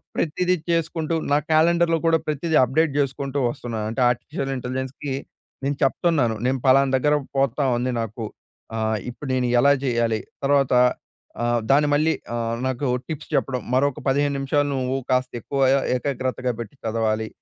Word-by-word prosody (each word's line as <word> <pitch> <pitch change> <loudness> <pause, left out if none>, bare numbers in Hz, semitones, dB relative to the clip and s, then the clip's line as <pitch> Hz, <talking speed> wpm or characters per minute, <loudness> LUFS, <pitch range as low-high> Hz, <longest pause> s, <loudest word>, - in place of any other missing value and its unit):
ప్రతీదీ 180 +3 +1 0.2
చేసుకుంటూ 165 -1 -1 0.2
నా 145 - +5
క్యాలెండర్‌లొ 165 +1 +4
కూడా 165 0 +5
ప్రతీదీ 155 +2 -1
అప్డేట్ 150 +5 +2
జేసుకుంటూ 140 0 -1
వస్తున్నాను. 115 -3 -4
అంటే 130 - -2
ఆర్టిఫిషియల్ 135 +4 -3
ఇంటెలిజెన్స్‌కి 130 +2 -4 0.5
నేను 140 +1 -1
చెప్తున్నాను. 135 -4 +2
నేను 130 +1 +1
ఫలానా 135 +1 +5
దగ్గర 150 +3 +2 0.2
పోతా 135 +1 +1
ఉంది 125 +1 -1
నాకు 115 0 -5 0.5
ఆహ్, 110 -1 0
ఇప్పుడు 140 +4 -8
నేను 125 -1 +1
ఎలా 140 +3 +5
జేయాలి. 120 -4 +1 0.2
తర్వాత 140 -2 +3 0.7
ఆహ్, 120 0 +2
దాన్ని 145 +2 +4
మళ్ళీ 155 +2 +3 0.2
ఆహ్, 115 0 -1
నాకు 130 +1 -2 0.2
టిప్స్ 155 -3 -6
చెప్పడం 130 -2 0
మరొక 140 +1 +1
పదిహేను 140 +1 +2
నిమిషాలు 145 +1 +1
నువ్వు 130 0 -1 0.2
కాస్త 130 0 +1
ఎక్కువ 140 +5 -4
య - - +4
య - - +2
ఏకాగ్రతగా 130 -1 -2
పెట్టి 115 +2 -7
చదవాలి. 110 -1 0
135 Hz, 150 wpm, -23 LUFS, 125-145 Hz, 0.7 s, నా